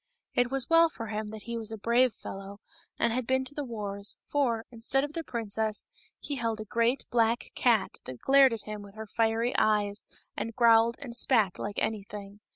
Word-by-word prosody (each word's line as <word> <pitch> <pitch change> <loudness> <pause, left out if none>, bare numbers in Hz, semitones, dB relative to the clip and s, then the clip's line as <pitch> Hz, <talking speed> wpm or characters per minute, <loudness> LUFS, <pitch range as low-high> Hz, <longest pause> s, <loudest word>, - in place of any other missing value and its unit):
It 245 0 +2
was 270 -1 +1
well 330 0 +6
for 230 -7 -7
him 215 0 -3
that 215 0 -8
he 235 0 -4
was 220 -1 -2
a 220 - -5
brave 235 +4 +3
fellow 195 0 -9 0.4
and 235 -1 +1
had 250 -1 -2
been 260 0 +1
to 260 - -6
the 290 - -3
wars, 205 -5 -4
for, 240 -6 0
instead 240 +3 0
of 290 +1 -4
the 330 - -3
princess, 220 -4 -2 0.3
he 285 - -5
held 230 -3 -1
a 215 - -5
great 235 +4 +1
black 230 0 +1
cat 230 -6 +2
that 130 - -7
glared 270 -1 +6
at 225 -2 -4
him 215 -1 -6
with 200 0 -13
her 220 0 -6
fiery 225 +3 0
eyes, 210 -1 +1 0.3
and 230 -1 -4
growled 230 -1 +5
and 250 -5 -7
spat 225 -6 +2
like 205 0 -4
anything. 205 -1 -4
230 Hz, 200 wpm, -29 LUFS, 210-245 Hz, 0.4 s, well